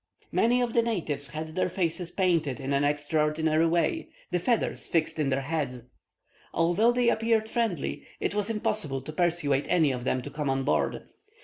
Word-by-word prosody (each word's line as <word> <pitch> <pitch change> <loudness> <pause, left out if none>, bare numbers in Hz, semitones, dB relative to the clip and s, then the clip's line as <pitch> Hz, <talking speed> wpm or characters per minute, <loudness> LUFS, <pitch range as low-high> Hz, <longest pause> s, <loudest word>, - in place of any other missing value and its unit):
"Many 245 +2 +3
of 235 -2 -2
the 235 - +4
natives 165 -11 -2
had 155 +2 -5
their 185 +3 -1
faces 175 -1 -1
painted 170 -8 +1
in 135 +1 -2
an 140 +1 +2
extraordinary 150 +2 +1
way, 175 - 0 0.2
and 180 - 0
feathers 235 +4 0
fixed 160 -1 0
in 145 -3 +1
their 135 0 +1
heads. 135 -5 -3 0.7
Although 175 +8 +3
they 245 -1 +2
appeared 225 -1 +2
friendly, 220 - -2
it - - -1
was 205 +1 0
impossible 210 -10 -1
to 155 - -7
persuade 155 -5 +1
any 160 -5 +3
of 125 -1 -4
them 130 0 0
to 145 - -7
come 150 -1 -2
on 135 0 0
board. - - 0
165 Hz, 180 wpm, -28 LUFS, 145-210 Hz, 0.7 s, the